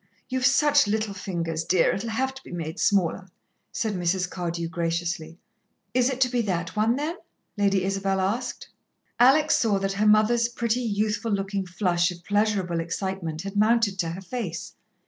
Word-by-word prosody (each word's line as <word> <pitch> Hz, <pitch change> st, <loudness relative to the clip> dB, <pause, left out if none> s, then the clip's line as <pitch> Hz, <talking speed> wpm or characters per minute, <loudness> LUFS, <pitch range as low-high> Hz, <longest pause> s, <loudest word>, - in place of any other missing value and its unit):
"You've 255 Hz, -1 st, +2 dB
such 290 Hz, -1 st, +4 dB
little 215 Hz, 0 st, -1 dB
fingers, 170 Hz, -4 st, -3 dB
dear, 180 Hz, 0 st, +3 dB
it'll 225 Hz, +4 st, -3 dB
have 265 Hz, +4 st, -1 dB
to 265 Hz, -, -12 dB
be -, -, -12 dB
made 170 Hz, +1 st, -5 dB
smaller," 190 Hz, -2 st, +1 dB, 0.4 s
said 220 Hz, -2 st, -2 dB
Mrs. 180 Hz, 0 st, 0 dB
Cardew 170 Hz, -1 st, -3 dB
graciously. 170 Hz, -1 st, -3 dB, 0.6 s
"Is 250 Hz, +1 st, +3 dB
it 260 Hz, -1 st, -3 dB
to 255 Hz, -, +6 dB
be 245 Hz, -1 st, +1 dB
that 180 Hz, -5 st, -2 dB
one, 220 Hz, +3 st, +2 dB
then?" 305 Hz, +6 st, -3 dB, 0.4 s
Lady 200 Hz, -2 st, +2 dB
Isabel 195 Hz, 0 st, 0 dB
asked. 230 Hz, +7 st, -2 dB, 0.5 s
Alex 290 Hz, +6 st, +5 dB
saw 215 Hz, -4 st, +2 dB
that 195 Hz, 0 st, -1 dB
her 210 Hz, +2 st, +1 dB
mother's 225 Hz, +3 st, +4 dB
pretty, 235 Hz, 0 st, -1 dB
youthful 215 Hz, 0 st, -1 dB
looking 195 Hz, -1 st, -2 dB
flush 180 Hz, -1 st, +1 dB
of 175 Hz, -1 st, -9 dB
pleasurable 205 Hz, -4 st, +1 dB
excitement 170 Hz, -1 st, -3 dB
had 195 Hz, +1 st, -6 dB
mounted 215 Hz, -2 st, +3 dB
to 170 Hz, -, 0 dB
her 175 Hz, +4 st, -6 dB
face. 190 Hz, -3 st, -5 dB
195 Hz, 165 wpm, -25 LUFS, 175-230 Hz, 0.6 s, to